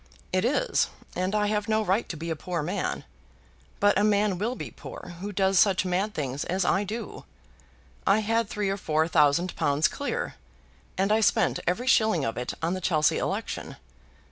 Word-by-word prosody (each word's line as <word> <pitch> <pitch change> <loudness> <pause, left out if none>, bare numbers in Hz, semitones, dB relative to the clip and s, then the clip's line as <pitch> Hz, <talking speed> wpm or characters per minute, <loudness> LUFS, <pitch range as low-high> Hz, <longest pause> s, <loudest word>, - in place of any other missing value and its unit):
"It - - +2
is, - - +2 0.3
and 185 +3 -1
I 210 0 +2
have 210 +1 -1
no 220 0 +2
right 195 +5 +1
to 165 - -5
be 165 +2 -4
a - - -1
poor 170 0 -3
man. - - -2 0.8
But 205 -1 +4
a - - +2
man 205 -3 +2
will 235 +5 -1
be - - -7
poor 175 - -9
who 205 +1 -4
does 190 -1 +2
such 195 -2 +4
mad 190 +4 -1
things 140 -2 -2
as 185 +1 0
I 195 - +2
do. 215 +2 -6 0.8
I 210 +2 +4
had 225 0 0
three 205 -2 -1
or 195 - -2
four 160 -3 +1
thousand 160 +2 +3
pounds 145 +2 +2
clear, - - -3 0.6
and 195 +2 +1
I 220 +1 +4
spent 210 - +2
every 180 +8 0
shilling 220 - +3
of 115 - -2
it 125 0 -4
on 170 +2 +1
the 185 - -4
Chelsea 155 -4 +2
election. - - -3
190 Hz, 190 wpm, -27 LUFS, 170-210 Hz, 0.8 s, But